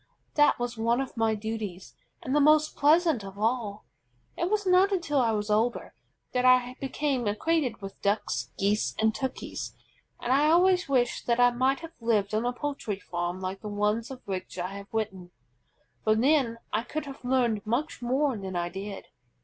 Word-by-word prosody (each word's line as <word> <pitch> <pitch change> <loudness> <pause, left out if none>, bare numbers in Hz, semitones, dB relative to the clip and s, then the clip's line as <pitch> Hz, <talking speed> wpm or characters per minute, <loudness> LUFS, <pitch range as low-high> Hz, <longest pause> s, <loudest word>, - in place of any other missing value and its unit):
That 295 -1 +4
was 240 -1 -4
one 230 +2 +2
of 270 -1 -4
my 225 -1 +1
duties, 210 -4 -5 0.3
and 260 - -1
the - - +5
most 305 +1 +4
pleasant 310 - +3
of 195 0 -9
all. 215 -1 -1 0.5
It 345 - -1
was 420 -1 0
not 370 +2 +5
until 335 -7 +1
I 240 -3 +3
was 210 -1 -1
older 225 +3 0 0.4
that 250 -1 +1
I 255 0 +4
became 270 -3 -1
acquainted 245 0 0
with 195 - -8
Ducks, 125 - -1
Geese, 205 +2 +1
and 220 0 +2
Turkeys, 265 +2 -5 0.4
and 245 - 0
I 290 +3 +4
always 360 0 +4
wish 250 -3 +1
that 235 0 +1
I 245 0 +6
might 260 +5 +1
have 330 0 -9
lived 220 -3 +1
on 220 +3 +1
a - - +1
poultry 250 -6 -4
farm 175 0 -4
like 190 +1 -4
the 210 - -5
one 210 +2 +1
of 260 -1 -9
which 185 -2 -5
I 180 +2 -3
have 200 0 -10
written, 200 -5 -3 0.7
for 215 - +3
then 255 -1 +2 0.2
I 215 - +2
could 305 +6 -5
have 275 -1 -10
learned 245 -5 +1
much 250 +6 -1
more 260 +2 +1
than 190 -3 -6
I 175 0 -1
did. 195 +2 -7
235 Hz, 185 wpm, -28 LUFS, 205-275 Hz, 0.7 s, I